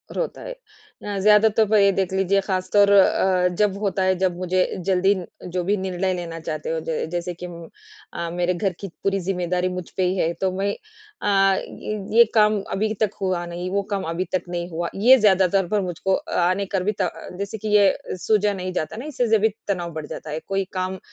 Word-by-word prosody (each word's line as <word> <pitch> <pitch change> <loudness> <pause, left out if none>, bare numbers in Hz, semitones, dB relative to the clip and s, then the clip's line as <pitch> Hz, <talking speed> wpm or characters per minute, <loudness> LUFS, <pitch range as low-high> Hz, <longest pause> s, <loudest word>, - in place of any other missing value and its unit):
रोता - - -3
है। - - -7
अ, 430 - -10
ज़्यादा 210 +2 +5
तो 220 - +6
ये 200 -1 +5
देख 190 -1 -1
लीजिए 195 +1 +2
ख़ासतौर 200 +1 +2
अ, 190 -2 +4
जब 200 -2 +2
होता 195 -2 0
है 185 0 +3
जब 185 -2 0
मुझे 185 0 +1 0.2
जल्दी 190 +1 +3 0.3
जो 180 0 -2
भी 200 +4 +1
निर्णय 185 0 -1
लेना 170 -2 -5
चाहते 155 -1 -5
हो 160 0 -1
ज 160 - -1
जैसे 175 0 -3
कि - - -2 0.7
अ, 170 0 -3
मेरे 180 +1 0
घर 185 +1 -1
की 200 - -5 0.2
पूरी 195 0 +1
ज़िम्मेदारी 180 -1 -1
मुझ 180 -1 -6
पे 185 - +2
ही 185 +1 -1
है। 165 -1 +1
तो 190 -1 +1
मैं 200 +1 0 0.5
अ, 195 -1 +3
ये 215 - -5 0.2
ये 235 - +10
काम 210 -1 +4
अभी 215 +2 0
तक 210 -2 +2
हुआ 185 -2 -1
नहीं 175 +1 -5
वो 200 0 +1
काम 195 - -1
अभी 175 +3 -2
तक - - -1
नहीं 175 0 -4
हुआ। 170 0 -3
ये 245 +7 +7
ज़्यादातर 190 -3 +3
पर 205 +1 +1
मुझको 185 +1 -1 0.3
आने 190 +2 +1
का 190 - +2
भी 195 +3 0
जैसे 195 +3 -4
कि 215 - -6
ये 195 -2 +2
सूझा 210 +1 +1
नहीं 185 -1 -4
जाता 155 +5 -3
ना, 245 - -6
इससे 245 -7 +1
भी 220 +2 +3 0.2
तनाव 175 -4 -2
बढ़ 155 -1 -5
जाता 155 - -8
है, 155 - -3
कोई 195 0 0
काम 185 0 -3
190 Hz, 205 wpm, -23 LUFS, 180-200 Hz, 0.7 s, ये